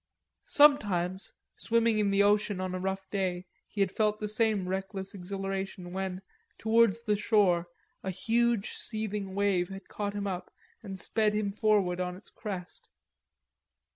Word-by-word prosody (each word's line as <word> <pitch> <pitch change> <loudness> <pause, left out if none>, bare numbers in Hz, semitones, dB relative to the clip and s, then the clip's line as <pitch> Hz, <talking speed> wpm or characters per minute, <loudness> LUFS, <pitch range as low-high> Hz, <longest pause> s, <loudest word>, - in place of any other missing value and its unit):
Sometimes, 195 -11 +4 0.3
swimming 230 -1 +2
in 205 -1 +2
the 200 0 +4
ocean 205 -1 +2
on 185 0 -2
a 185 - -2
rough 190 +1 -3
day, 185 -2 -1 0.2
he 205 - -3
had 195 -2 +2
felt 215 0 +1
that 210 - -2
same 215 -3 +2
reckless 190 +1 -4
exhilaration 195 -1 -4
when, 190 0 -3 0.3
towards 230 0 +3
the 210 -3 +2
shore, 200 -5 +3 0.3
a 190 - -4
huge 230 +2 +1
seething 210 -3 -4
wave 195 -3 +1
had 195 0 -9
caught 205 -1 -3
him 205 0 -2
up 185 -2 -4 0.3
and 195 -1 -7
sped 215 0 +1
him 210 -1 0
forward 200 -4 +2
on 180 0 -2
its 190 - -12
crest. 185 -4 -7
200 Hz, 150 wpm, -30 LUFS, 190-215 Hz, 0.3 s, Sometimes